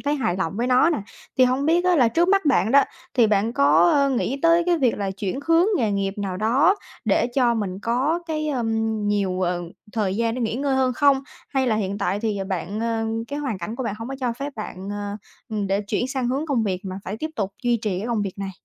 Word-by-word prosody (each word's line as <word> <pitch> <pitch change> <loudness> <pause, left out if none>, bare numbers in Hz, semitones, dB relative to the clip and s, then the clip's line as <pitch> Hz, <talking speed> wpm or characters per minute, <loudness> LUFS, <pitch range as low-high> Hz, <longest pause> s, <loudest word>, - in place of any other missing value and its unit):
thấy 290 +1 0
hài 220 -11 -1
lòng 190 -4 -1
với 235 +2 0
nó 255 +6 +4
nè. 320 - 0 0.4
Thì 255 - +7
hông 255 +3 +1
biết 340 +3 +3
á 365 -1 +4
là 250 -6 +5
trước 340 +10 +2
mắt 395 -1 +3
bạn 245 -6 +3
đó, 280 +2 +6 0.3
thì 240 -3 +5
bạn 210 +2 +1
có, 155 +1 +4
a, 280 -1 +3
nghĩ 265 +1 -1
tới 335 +1 +5
cái 350 -1 +3
việc 250 -5 +2
là 200 -1 -1
chuyển 195 +4 -4
hướng 330 +2 +4
nghề 230 -9 +1
nghiệp 195 -1 -1
nào 195 -2 -3
đó 255 - +3 0.3
để - - +2
cho 245 -3 +3
mình 195 -4 -3
có 260 +8 +1
cái, 310 -1 -2
ờm, 225 -4 -1
nhiều, 195 -3 0
ờ, 175 -1 0 0.3
thời 200 -4 -1
gian 230 0 0
để 255 - -4
nghỉ 225 -1 -1
ngơi 275 +1 0
hơn 260 -1 +2
không? 275 +1 +3 0.3
Hay 265 -2 0
là 220 -3 +2
hiện 200 -1 -2
tại 195 +3 -1
thì 215 -3 -1
bạn, 195 +3 -3
ờ, 225 -1 -1 0.2
cái 285 - -4
hoàn 265 -9 -3
cảnh 210 +7 -5
của 260 - -3
bạn 210 - -2
hông 225 - -6
có 270 - -4
cho 245 -2 0
phép 280 +4 -5
bạn, 195 -3 -6
ờ, 205 0 -4 0.3
ừm, 210 -2 -2
để 195 +1 +1
chuyển 210 +5 -2
sang 260 -2 -1
hướng 275 +5 -1
công 270 -7 +1
việc 190 -4 -1
mà 190 0 -5
phải 200 - -4
tiếp 315 +7 -4
tục 200 -4 -2
duy 240 -1 +2
trì 210 -5 -2
cái 210 - -4
công 235 -3 0
việc 195 -1 -5
này? 195 -1 -3
230 Hz, 255 wpm, -23 LUFS, 200-270 Hz, 0.4 s, Thì